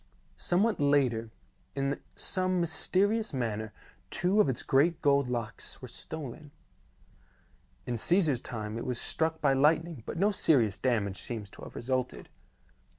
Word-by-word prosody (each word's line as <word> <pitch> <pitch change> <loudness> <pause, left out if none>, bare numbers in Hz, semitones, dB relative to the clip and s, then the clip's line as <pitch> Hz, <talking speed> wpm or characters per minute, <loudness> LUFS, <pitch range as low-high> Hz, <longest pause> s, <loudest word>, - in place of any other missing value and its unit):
Somewhat 205 +5 +1
later, 135 -6 +2 0.5
in 140 0 -1 0.2
some 185 -1 0
mysterious 195 +6 +1
manner, 110 -3 -2 0.4
two 185 - +2
of 145 - +2
its 125 - -2
great 155 +5 +3
gold 140 -2 +3
locks 120 -3 -4
were - - -8
stolen. 150 -1 -7 1.4
In 120 -1 -2
Caesar's 155 - +2
time 110 -1 -5
it - - -5
was 125 -2 -2
struck 160 0 0
by 140 -2 +4
lightning 155 +1 +2
but - - -4
no 200 +4 +3
serious 120 - +3
damage 105 -6 0
seems 105 -4 -6
to - - -13
have - - -10
resulted. 130 +1 -2
140 Hz, 140 wpm, -30 LUFS, 120-170 Hz, 1.4 s, by